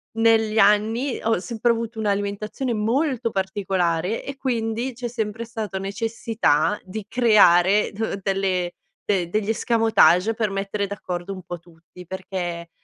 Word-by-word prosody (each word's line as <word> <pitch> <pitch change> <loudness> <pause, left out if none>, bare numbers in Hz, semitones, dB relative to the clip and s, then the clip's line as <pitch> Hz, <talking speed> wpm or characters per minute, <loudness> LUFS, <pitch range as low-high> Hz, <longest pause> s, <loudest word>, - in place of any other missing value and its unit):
negli 225 -1 +3
anni, 220 +6 +3
ho 225 -4 +1
sempre 235 +3 0
avuto 230 0 -3
un'alimentazione 210 +4 -2
molto 230 +2 0
particolare, 190 -1 -1
e 275 -1 -7
quindi 235 -1 -2
c'è 240 +1 -5
sempre 225 -1 -3
stata 220 -4 -5
necessità 210 -4 0
di 200 +2 -6
creare 205 -5 +4
d 210 -1 -3
delle 190 -2 -1 0.3
de 190 -4 +1
degli 215 +2 -1
escamotage 225 -4 +3
per 220 -3 0
mettere 195 +1 -2
d'accordo 190 -2 -5
un 185 - -8
po' 175 0 -7
tutti, 170 +1 -16
perché, 175 -2 -5
210 Hz, 130 wpm, -23 LUFS, 190-225 Hz, 0.3 s, creare